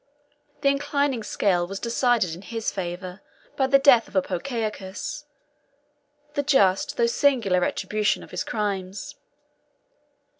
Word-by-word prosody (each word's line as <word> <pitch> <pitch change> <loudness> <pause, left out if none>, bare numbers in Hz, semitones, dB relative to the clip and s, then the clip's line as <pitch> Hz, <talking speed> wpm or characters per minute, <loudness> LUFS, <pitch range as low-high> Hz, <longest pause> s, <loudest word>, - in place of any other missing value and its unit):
The 280 - +4
inclining 280 -2 0
scale 180 -4 0
was 195 +1 -5
decided 235 -6 +1
in 175 - -9
his 225 +2 -3
favor 180 0 -5 0.3
by 265 - +2
the 275 +1 +6
death 265 -5 +5
of - - -17
Apocaucus, 215 - -3 1.1
the 285 - 0
just 205 -10 +2
though 235 - +3
singular 235 -6 +2
retribution 210 +3 0
of - - -14
his - - -2
crimes. 200 -3 -3
220 Hz, 120 wpm, -25 LUFS, 190-270 Hz, 1.1 s, the